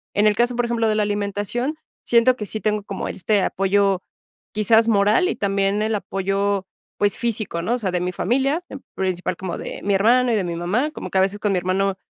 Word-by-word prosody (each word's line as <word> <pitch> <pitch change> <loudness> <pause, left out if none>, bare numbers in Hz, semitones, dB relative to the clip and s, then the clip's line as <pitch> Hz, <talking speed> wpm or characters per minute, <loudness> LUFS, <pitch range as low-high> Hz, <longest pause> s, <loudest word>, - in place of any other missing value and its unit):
en 205 - +3
el 210 -1 +4
caso, 240 +2 +1
por 240 0 +1
ejemplo, 230 -1 0
de 215 - +1
la 215 - +2
alimentación, 205 +7 -2 0.3
siento 240 +2 +4
que 210 -4 -6
sí 215 +2 -4
tengo 210 -1 0
como 195 -1 -5
este 200 +2 0
apoyo, 195 0 +1 0.5
quizás, 220 +2 +4
moral 215 - +3
y - - -1
también 200 +1 0
el 220 0 0
apoyo, 195 0 -1 0.3
pues, 205 -1 +1
físico, 215 -8 -2
¿no?, 215 +8 -1
o - - -2
sea, 200 -6 -2
de 180 -1 -1
mi 180 0 -1
familia, 275 - 0
en 270 - -9
principal 185 -1 -2
como 185 -3 -4
de - - -7
mi 200 - +1
hermano 240 +5 +4
y - - +2
de 205 - 0
mi 170 -1 -3
mamá, 195 - 0
como - - -7
que - - 0
a - - +5
veces 195 +2 0
con 210 -1 0
mi - - +1
hermano, 190 +2 0
205 Hz, 230 wpm, -22 LUFS, 195-230 Hz, 0.5 s, a